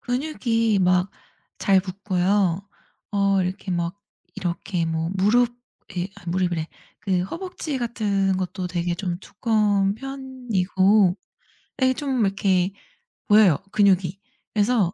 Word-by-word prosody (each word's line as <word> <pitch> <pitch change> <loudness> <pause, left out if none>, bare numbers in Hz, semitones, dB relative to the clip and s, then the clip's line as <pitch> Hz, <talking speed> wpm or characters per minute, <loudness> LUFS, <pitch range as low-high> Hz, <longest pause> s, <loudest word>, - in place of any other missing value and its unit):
근육이 240 -5 0
막 180 +1 +3 0.5
잘 195 -1 +4
붙고요. 190 0 0 0.4
어 200 -1 +2
이렇게 190 +2 -4
막 175 +1 -1 0.4
이렇게 175 -2 -2
뭐 165 0 -1
무릎에 210 -3 0
아 190 - -14
무릎이래. 175 -2 0 0.3
그 185 -3 0
허벅지 335 - -5
같은 200 -5 0
것도 185 0 -3
되게 175 -1 -1
좀 175 -1 -3
두꺼운 205 -3 +1
편이고 215 -8 +1 0.6
되게 260 -1 +3
좀 265 -2 -1
이렇게 195 -1 +1 0.6
보여요, 205 -7 +6
근육이. 195 -3 +3 0.3
그래서 210 -4 +2
195 Hz, 230 characters per minute, -23 LUFS, 180-225 Hz, 0.6 s, 보여요